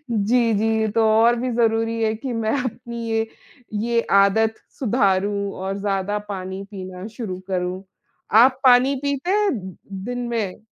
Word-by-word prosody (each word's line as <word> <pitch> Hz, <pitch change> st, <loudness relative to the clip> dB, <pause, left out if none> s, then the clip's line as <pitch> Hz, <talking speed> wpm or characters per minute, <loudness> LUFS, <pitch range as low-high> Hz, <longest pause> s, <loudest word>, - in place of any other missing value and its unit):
जी, 230 Hz, +2 st, +2 dB
जी 220 Hz, +1 st, +1 dB
तो 225 Hz, -, +4 dB
और 230 Hz, +2 st, +5 dB
भी 255 Hz, +1 st, -1 dB
ज़रूरी 225 Hz, 0 st, +1 dB
है, 220 Hz, 0 st, +1 dB
कि 250 Hz, +3 st, -5 dB
मैं 225 Hz, -1 st, -1 dB
अपनी 235 Hz, -1 st, -5 dB
ये, 225 Hz, 0 st, +1 dB, 0.5 s
ये 230 Hz, +3 st, +1 dB
आदत 200 Hz, +3 st, +4 dB, 0.3 s
सुधारूँ 200 Hz, -4 st, +1 dB
और 190 Hz, +1 st, -4 dB
ज़्यादा 200 Hz, 0 st, -1 dB
पानी 190 Hz, 0 st, -5 dB
पीना 185 Hz, -1 st, -7 dB
शुरू 200 Hz, -7 st, -4 dB
करूँ। 185 Hz, 0 st, -2 dB, 0.5 s
आप 255 Hz, +4 st, +6 dB
पानी 255 Hz, +2 st, +6 dB
पीते 280 Hz, +5 st, -1 dB
हैं, 415 Hz, 0 st, +2 dB, 0.5 s
दिन 245 Hz, +1 st, -3 dB
में? 220 Hz, -3 st, -3 dB
220 Hz, 145 wpm, -22 LUFS, 200-235 Hz, 0.5 s, आप